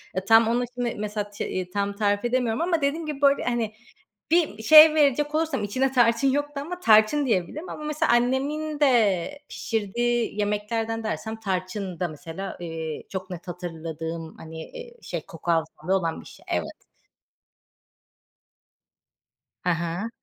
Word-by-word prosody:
E, 190 - -2
tam 225 +2 +6
onu 240 +2 +1
şimdi 245 -1 -2
mesela 210 0 -3
ti 185 -3 -4
tam 200 0 -1
tarif 205 0 0
edemiyorum 240 -1 0
ama 335 -3 +1
dediğim 305 +4 0
gibi 295 -2 -5
böyle, 280 0 +4
hani, 235 -3 -1 0.6
bir 325 -10 +2
şey 310 +4 +10
verecek 295 +1 +2
olursam 315 -7 0
içine 260 +6 0
tarçın 240 +1 +3
yoktu 290 +1 -1
ama 355 +4 -6
tarçın 220 +4 +5
diyebilirim 240 - -1
ama 305 - -7
mesela 300 -4 0
annemin 285 +5 0
de 240 - +2
pişirdiği 230 +1 -1
yemeklerden 220 +2 -1
dersem, 220 0 -3
tarçın 185 -2 -3
da 180 - 0
mesela, 165 +5 -7
eee, 160 -2 -5
çok 190 0 -5
net 180 0 -8
hatırladığım, 165 -2 -6
hani, 160 0 -9
eee, 485 -1 -10
şey 170 -3 -5
koku 170 +1 -4
hafızası 165 +2 -1
olan 165 -2 -3
bir - - -17
şey. - - -15
Evet. - - -3 2.8
Hı 180 - +1
hı. 170 +6 -2
220 Hz, 145 wpm, -25 LUFS, 185-275 Hz, 2.8 s, şey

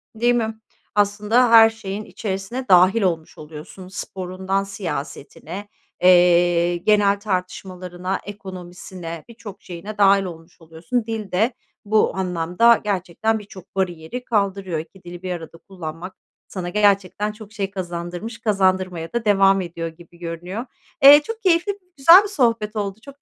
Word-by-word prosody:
Değil 240 +2 +2
mi? 220 -2 -2 0.4
Aslında, 210 +4 +2
her 225 -1 +9
şeyin 215 -2 -6
içerisine 210 +5 -5
dâhil 185 +4 +5
olmuş 165 -5 -2
oluyorsun. 155 +4 -11
Sporundan 190 0 -3
siyasetine, 195 0 -7 0.3
eee, 175 -1 +4
genel 200 +2 +3
tartışmalarına, 185 -1 -4
ekonomisine, 180 -4 -8
birçok 220 -4 -11
şeyine 190 +4 -8
dâhil 200 -1 +5
olmuş 170 -1 -10
oluyorsun. 165 +10 -3
Dil 220 -4 -5
de 220 +7 +1 0.3
bu 215 +1 +2
anlamda 180 +5 +2
gerçekten 205 +2 -1
birçok 195 -3 -14
bariyeri 185 +5 -3
kaldırıyor. 195 -6 -1
2 180 +4 -11
dili 175 0 -10
bir 185 - -3
arada 165 -2 -7
kullanmak 175 0 -8 0.3
sana 180 -2 -5
gerçekten 205 +1 +1
çok 215 0 -13
şey 200 -2 -3
kazandırmış, 180 +4 -6
kazandırmaya 185 -5 0
da 235 -1 -2
devam 195 -1 +4
ediyor 170 -2 -5
gibi 170 +1 -14
görünüyor. 175 +6 -6 0.4
Eee, 290 +2 +10
çok 455 +6 -6
keyifli, 375 +2 +2 0.2
güzel 335 +8 +8
bir - - -4
sohbet 230 - 0
oldu. 200 -1 -3
Çok 280 0 -13
195 Hz, 135 wpm, -21 LUFS, 175-215 Hz, 0.4 s, Eee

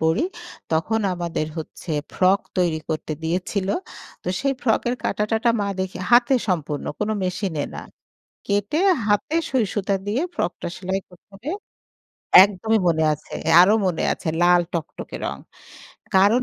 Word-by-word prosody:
পড়ি 160 - +2 0.5
তখন 195 +8 +1
আমাদের 170 -3 -2
হচ্ছে 160 +2 -8 0.2
ফ্রক 190 +2 +3 0.2
তৈরি 170 -3 +2
করতে 155 -1 -3
দিয়েছিল। 185 +4 -1 0.5
তো - - -4
সেই 275 0 +1
ফ্রক 225 -4 +2 0.2
কাটা-টাটা 220 +3 +1
মা 200 - 0
দেখে 190 0 -3
হাতে 240 +2 +6
সম্পূর্ণ 150 -5 -1
কোন 210 - -1 0.2
মেশিনে 180 -4 -2
না। - - -5 0.7
কেটে 205 +9 0 0.3
হাতে 205 +9 +1
সইসুতা 205 -5 0
দিয়ে 215 +7 0
ফ্রকটা 175 - -2
সেলাই 190 +1 -2
করতে 180 +3 -20
হবে। 255 +11 -5 0.9
একদমই 210 +3 +1
মনে 160 -1 +2
আছে। 150 - -11 0.3
আরো 195 +4 +6
মনে 175 -3 0
আছে - - -8
লাল 175 0 +6
টকটকে 165 -2 -5
রং। - - -3 0.8
কারণ 205 +6 +5
190 Hz, 135 wpm, -23 LUFS, 170-215 Hz, 0.9 s, হাতে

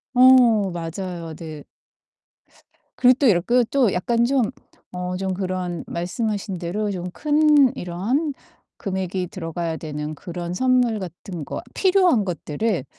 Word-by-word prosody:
어 245 -5 +6
맞아요. 170 0 -5
네. 155 -2 -8 1.3
그리고 250 0 +6
또 280 - +4
이렇게 235 +5 +3
또 255 -8 +3
약간 235 +6 +1
좀 250 -3 +1 0.4
어 180 0 -3
좀 190 0 -2
그런 185 -2 -3
말씀하신 195 +1 -3
대로 205 +5 -2
좀 180 -2 -4
큰 295 - +4
이런 220 - -1 0.5
금액이 190 -2 -3
들어가야 165 -3 -4
되는 150 -1 -5
그런 175 +2 -6
선물 250 0 +2
같은 175 -2 -7
거 - - -5
필요한 365 - +3
것들을 175 - -2
190 Hz, 240 characters per minute, -22 LUFS, 175-240 Hz, 1.3 s, 어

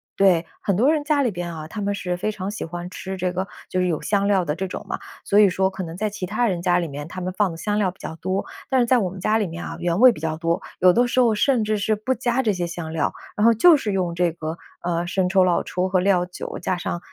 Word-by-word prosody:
对， 180 -4 +4 0.2
很 200 - 0
多 250 +10 +4
人 310 -2 0
家 295 -1 +2
里 255 - +2
边 175 -3 -5
啊， 155 -1 -7
他 210 - -7
们 200 0 -1
是 180 -3 -3
非 215 +4 -1
常 195 -2 -5
喜 210 - -4
欢 175 +1 -6
吃 190 +1 -6
这 180 0 -1
个 185 +2 -3 0.2
就 185 - -1
是 180 - +2
有 165 -4 -1
香 200 +5 +1
料 195 -3 +3
的 150 -3 -2
这 190 +2 -3
种 - - -6
嘛， - - -2 0.3
所 205 - +3
以 210 - +8
说 190 0 +1
可 190 0 -6
能 165 -1 -7
在 215 +3 -1
其 200 -2 -5
他 215 +6 0
人 185 -5 -1
家 175 0 +3
里 170 - -2
面， 145 0 -7
他 185 +2 -7
们 185 +1 -2
放 205 -4 +2
的 - - -7
香 205 +5 -1
料 200 -3 +1
比 190 - -26
较 160 - -6
多。 185 +4 -2 0.3
但 265 - +3
是 - - +3
在 255 - +5
我 190 -6 0
们 190 - -9
家 215 +4 +2
里 215 - +1
面 170 -1 -6
啊， - - -6
原 175 +1 0
味 255 +1 +9
比 230 - -8
较 155 0 -2
多， 165 +1 0 0.2
有 185 - +6
的 240 +7 +3
时 255 - +1
候 235 -3 +4
甚 245 +1 +2
至 215 0 0
是 215 +1 +1
不 235 +5 -1
加 245 +1 0
这 225 -5 +1
些 180 -3 -2
香 170 -2 -6
料， 160 -1 -1 0.2
然 210 - +3
后 230 - +7
就 315 +8 +6
是 220 -6 -2
用 180 -3 -1
这 175 -1 +2
个， 160 0 -5 0.2
呃， 175 0 -1
生 185 0 0
抽、 190 0 +4
老 180 -1 +2
抽 180 +1 -1
和 190 0 +2
料 180 -1 +2
酒 180 - -7
加 185 +1 -1
上， 175 - -3
185 Hz, 320 characters per minute, -23 LUFS, 175-210 Hz, 0.3 s, 味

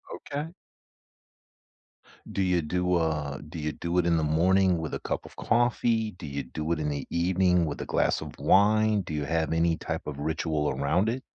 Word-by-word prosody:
Okay. 145 +2 -5 1.8
Do 100 - -1
you 90 -2 +2
do, 90 +3 0
uh 75 -5 -1
do 85 +1 -7
you 75 0 -2
do 85 +3 -3
it 85 - +1
in 85 -1 +3
the 80 - +1
morning 90 +4 +3
with 80 -1 -5
a - - -4
cup - - -3
of - - -13
coffee? 115 -2 +1
Do 90 -3 -11
you 70 -1 -4
do 75 +5 -4
it 85 - 0
in 75 - -1
the 70 -1 -3
evening 90 0 +2
with 75 - -4
a - - -4
glass - - +1
of - - -8
wine? 105 +1 +4
Do 85 - -7
you 75 -1 -2
have 80 0 0
any 80 0 +2
type 80 0 -4
of 70 -1 -5
ritual 80 0 -1
around 75 +10 +1
it? 125 +3 -2
85 Hz, 200 wpm, -27 LUFS, 75-95 Hz, 1.8 s, wine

